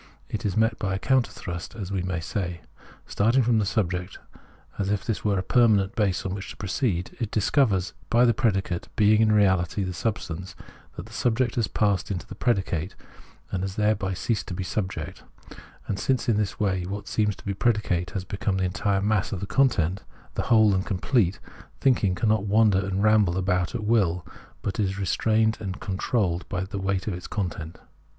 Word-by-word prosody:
It - - -2
is 95 - -2
met 110 0 +2
by 95 -1 -1
a - - -1
counter 130 +5 +2
thrust, 85 +4 -7
as 100 -4 -6
we 95 -2 -1
may 90 -2 -2
say. 85 0 -4 0.4
Starting 115 +6 +2
from 115 -1 +3
the 105 - 0
subject, 90 -3 -1 0.6
as 100 -1 0
if 105 -1 -1
this 115 - -2
were 100 -2 +1
a 95 - -1
permanent 105 -3 +3
base 100 -4 0
on 95 - -2
which 100 0 -6
to - - -9
proceed, 95 -3 -1
it 115 -4 -2
discovers, 105 -3 +2 0.2
by 120 +1 +5
the 120 - +4
predicate 95 -8 0
being 110 -1 +5
in 110 - +4
reahty 95 -2 +2
the 90 - -4
substance, 95 -2 -4 0.4
that - - -7
the - - -14
subject 120 0 +1
has 115 -3 0
passed 100 -5 0
into 95 -4 -3
the - - -9
predicate, 95 -6 -1 0.6
and 95 - -1
has 95 0 -3
thereby 105 -3 +1
ceased 110 +4 -1
to 90 - -4
be 95 - -3
subject: 95 +1 -4 0.6
and 100 - -3
since 130 +3 0
in 115 - +3
this 105 -2 -1
way 95 -3 +1
what 100 +1 -5
seems 105 -2 +1
to - - -17
be 100 - -1
predicate 100 -5 0
has 95 - -1
become 100 0 -2
the 95 - 0
entire 100 +1 0
mass 105 -2 +1
of 100 - -3
the 100 - -3
content, 100 - +2 0.3
whole 110 -3 +4
and 95 0 +1
complete, 100 -1 +1 0.4
thinking 110 -9 +2
cannot 110 0 +1
wander 105 -1 +4
and 95 +1 -1
ramble 105 -5 +4
about 90 -2 0
at 110 - -3
will, 95 -7 +2 0.4
but 100 - -3
is 95 -2 0
restrained 110 +3 +1
and 95 -2 -5
con 95 - -4
trolled 95 -4 0
by 95 -3 -2
this 95 - -9
weight 95 -1 -1
of 90 -4 -4
content. 85 -5 -4
100 Hz, 195 wpm, -26 LUFS, 95-110 Hz, 0.6 s, by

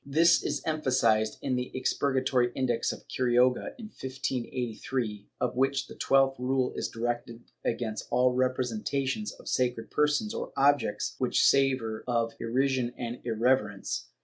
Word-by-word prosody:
^ - - -45
This 165 +4 +5
is - - -2
emphasized 125 -8 +2
in 130 -2 0
the 125 0 -2
Expurgatory 130 -2 +1
Index 125 -3 0
of - - -10
Quiroga, 125 0 +2
in 235 - -8
1583, 125 - -4
of 125 -1 -1
which 135 +2 +1
the - - -11
twelfth 135 -1 +2
rule 130 0 0
is - - -2
directed 120 0 -4 0.2
against 115 -2 -2
all 125 0 +3
representations 130 - -1
of - - -15
sacred 120 -3 -1
persons 150 +9 +1
or - - -5
objects 140 -1 +2
which - - +2
savor 130 -5 +2
of 115 -2 0
irrision 125 +1 0
or 120 0 -4
irreverence. 115 -3 0
125 Hz, 140 wpm, -29 LUFS, 120-135 Hz, 0.2 s, This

